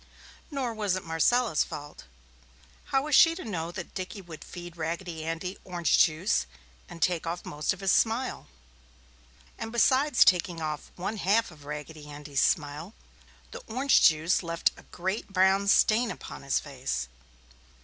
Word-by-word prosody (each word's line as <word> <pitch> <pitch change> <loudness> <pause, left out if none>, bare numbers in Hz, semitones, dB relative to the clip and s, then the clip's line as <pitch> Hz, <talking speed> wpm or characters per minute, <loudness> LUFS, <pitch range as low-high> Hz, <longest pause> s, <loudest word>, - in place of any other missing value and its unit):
Nor 270 -6 -2
was 205 -4 0
it 185 - -4
Marcella's 165 +4 +2
fault. 145 - -9 0.8
How 270 0 +1
was 300 0 -3
she 330 +3 +7
to 370 - -7
know 170 -6 -3
that 175 0 -7
Dickie 185 +1 -6
would 165 -3 -10
feed 175 -1 -9
Raggedy 165 0 -4
Andy 165 +4 -4
orange 175 -3 +1
juice 165 +6 +2 0.4
and 170 -3 -4
take 170 -2 0
off 175 +1 -4
most 150 0 -1
of 190 - -5
his 195 -2 +2
smile? 235 +3 +1 1.1
And 225 - -5
besides 260 +4 +4
taking 175 -2 +2
off 155 -1 -4
one 195 +5 -4
half 210 +2 +2
of 150 -3 -15
Raggedy 150 +1 -7
Andy's 145 -1 -3
smile, 155 +5 0 0.6
the - - -8
orange 260 +4 +3
juice 160 +3 +4
left 170 -1 0
a - - -14
great 190 +4 -3
brown 190 +1 +3
stain 225 +4 +4
upon - - -8
his 140 0 +1
face. 135 - -4
180 Hz, 155 wpm, -28 LUFS, 160-215 Hz, 1.1 s, she